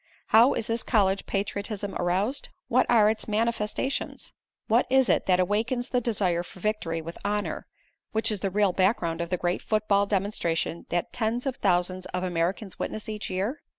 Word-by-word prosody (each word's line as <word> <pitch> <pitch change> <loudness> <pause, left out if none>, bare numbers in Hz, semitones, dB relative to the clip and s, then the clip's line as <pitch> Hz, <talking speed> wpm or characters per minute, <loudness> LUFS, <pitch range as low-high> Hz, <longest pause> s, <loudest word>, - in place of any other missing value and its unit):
How 230 +4 +6
is 225 - -1
this 230 0 0
college 195 -4 +1
patriotism 200 0 -3
aroused? 190 +9 0 0.2
What 255 0 +3
are 220 -3 +6
its 215 0 0
manifestations? 225 +4 -2 0.3
What 235 +3 +3
is 265 -1 +4
it - - +2
that 180 -1 +4
awakens 225 +7 0
the 250 -2 +1
desire 195 -7 0
for 180 - -12
victory 170 -5 -2
with 165 +1 -8
honor, 210 0 -2 0.4
which 220 +1 0
is 210 - -2
the 195 - -1
real 200 -1 +2
background 175 -4 +1
of 170 - -3
the 180 - 0
great 175 +1 -1
football 210 -2 +1
demonstration 185 -5 -1
that 175 0 -2
tens 235 +2 -1
of 265 -2 -2
thousands 185 -1 +1
of 180 0 -3
Americans 180 +3 -2
witness 215 - -4
each 215 -1 -4
year? 200 - -2
205 Hz, 175 wpm, -27 LUFS, 180-225 Hz, 0.4 s, How